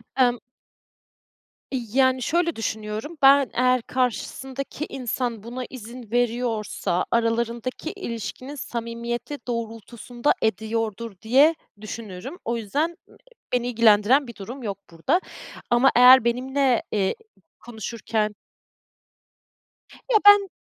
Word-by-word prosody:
Emm 245 -2 +3 1.3
yani, 260 +1 +1
şöyle 335 +4 +1
düşünüyorum, 220 +7 -4
ben 275 -1 +6
eğer 250 0 +3
karşısındaki 265 +4 -3
insan 240 -3 -3
buna 245 +2 -5
izin 235 -2 -10
veriyorsa, 235 -6 0
aralarındaki 235 +5 -1
ilişkinin 255 - -6
samimiyeti 235 +2 -4
doğrultusunda 235 +2 -2
ediyordur, 220 +1 -1
diye 275 +8 +5 0.3
düşünürüm. 215 - -7
O 235 0 -1
yüzden 295 - -2 0.6
beni 245 -1 +1
ilgilendiren 235 +3 +4
bir 235 - -9
durum 245 +7 -8
yok 200 -3 -3
burada 265 - +1 0.5
ama 240 +3 +5
eğer 250 0 +9
benimle, 255 +1 +1
eee, 195 -2 0 0.5
konuşurken 220 -2 -3 1.8
Ya, 435 - +7
ben 410 -2 +8
240 Hz, 95 wpm, -24 LUFS, 225-260 Hz, 1.8 s, eğer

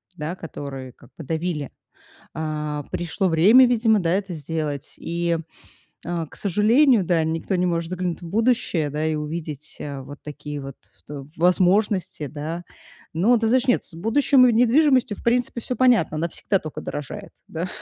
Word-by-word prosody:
да, 155 +2 -4
которые 140 -6 -7
как - - -20
бы 165 - -7
давили. 160 -1 -3 0.7
А, 150 -2 -3
пришло 175 +2 -1
время, 205 +11 +6
видимо, 225 -3 +3
да, 165 -2 0
это 195 -2 -1
сделать. 150 -2 -4
И, 170 0 -1 0.7
э, 170 -1 -2
к - - -15
сожалению, 220 - +4
да, 170 -2 +2
никто 165 +4 -2
не 180 0 +1
может 170 -1 -1
заглянуть 180 -1 -3
в 170 - -8
будущее, 220 -7 +1
да, 150 +2 -2
и 160 -1 0
увидеть, 150 -1 -6
э, 140 -2 -5
вот 145 +2 -10
такие 150 0 -7
вот 135 -1 -8 0.3
то 140 -2 -8
возможности, 180 -1 +2
да. 155 +4 -5 0.5
Но, 215 +10 +4
ты 225 - 0
знаешь, 255 +2 +2
нет, 245 - +3
с - - -14
будущем 255 +8 +4
и 240 - +3
недвижимостью, 250 -1 +3
в - - -13
принципе, 240 0 +1
всё 250 - -3
понятно, 240 -12 +3
она 170 +2 -1
всегда 195 +3 -1
только 155 - -7
дорожает, 145 -2 -6 0.2
да, 170 +3 -3
170 Hz, 170 wpm, -23 LUFS, 155-220 Hz, 0.7 s, время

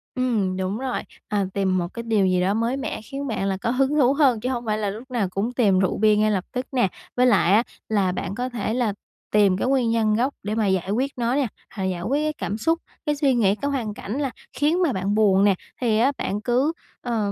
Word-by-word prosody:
Ừm, 220 -8 0
đúng 190 +2 -2
rồi, 260 0 -2 0.3
à, 205 -2 0
tìm 190 -2 +1
một 175 -1 -1
cái 235 - -5
điều 220 -4 +2
gì 185 -1 +2
đó 190 +2 +2
mới 230 +4 0
mẻ 275 -4 -4
khiến 275 +6 -6
bạn 220 -5 -2
là 190 -1 -1
có - - 0
hứng 270 +3 +1
thú 270 -3 +4
hơn 275 -6 +3
chứ 250 +4 -2
hông 245 -2 -3
phải 215 -1 0
là 210 -2 -1
lúc 230 +6 -8
nào 225 -6 0
cũng 200 +6 -2
tìm 205 -7 +3
rượu 190 - +1
bia 215 0 +4
ngay 215 +1 +2
lập 190 -3 -1
tức 250 +1 -3
nè, 245 -7 +2 0.3
với 250 - +5
lại 200 -6 +4
á 220 +3 +5 0.3
là 200 -4 +2
bạn 185 +1 -4
có 250 +3 -2
thể 225 -2 -2
là 235 -4 0 0.4
tìm 200 -3 +4
cái 195 - -1
nguyên 260 -3 +2
nhân 220 -2 +2
gốc 255 +5 +1
để 210 +2 -2
mà 220 -2 +1
giải 190 -1 0
quyết 260 +6 0
nó 240 +1 0
nè, 280 -3 +1 0.3
hoặc 195 - -3
giải 185 -2 -2
quyết 280 +11 0
cái 305 - 0
cảm 210 -8 -4
xúc, 325 +9 +1 0.3
cái 295 -1 +1
suy 280 -2 +2
nghĩ, 205 -5 +3
cái 285 +6 -2
hoàn 235 -6 -2
cảnh 215 +5 -5
là 275 -3 -1 0.2
khiến 315 +5 +1
mà 305 -7 +2
bạn 195 +1 -1
buồn 200 -3 +4
nè, 200 -2 +4 0.3
thì 225 -3 +2
á 265 +4 +4
bạn 205 +2 -2
cứ, 255 +8 +1 0.3
ờ, 225 -4 -1
225 Hz, 260 wpm, -23 LUFS, 200-255 Hz, 0.4 s, với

